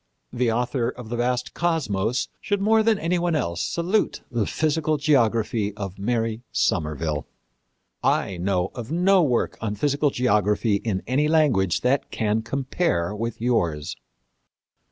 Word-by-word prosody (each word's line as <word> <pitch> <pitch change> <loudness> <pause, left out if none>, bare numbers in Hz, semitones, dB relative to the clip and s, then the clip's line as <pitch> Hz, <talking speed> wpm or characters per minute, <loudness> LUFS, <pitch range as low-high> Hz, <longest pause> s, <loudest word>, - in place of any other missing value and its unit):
The 120 -2 +1
author 120 +1 0
of 125 -3 -9
the 120 - -2
vast 125 +1 -1
Cosmos 125 - 0
should 205 -1 -1
more 220 +2 +4
than 220 -1 +3
any 175 +1 0
one 170 -1 0
else 85 - -1
salute 170 - 0
the 115 -4 0
Physical 155 0 0
Geography 115 - +1
of 100 -2 -6
Mary 115 +1 -1
Somerville.... 75 0 -1 0.8
I 95 - +1
know 90 +1 0
of 120 +2 -7
no 185 +3 +4
work 125 -7 0
on 105 -2 -2
physical 145 +6 +1
geography 105 -4 +2
in 100 -3 -3
any 140 +5 +1
language 140 - +2
that 135 +2 +1
can 110 0 0
compare 115 - -1
with 115 +1 -4
yours." 85 -11 0
120 Hz, 140 wpm, -24 LUFS, 105-150 Hz, 0.8 s, more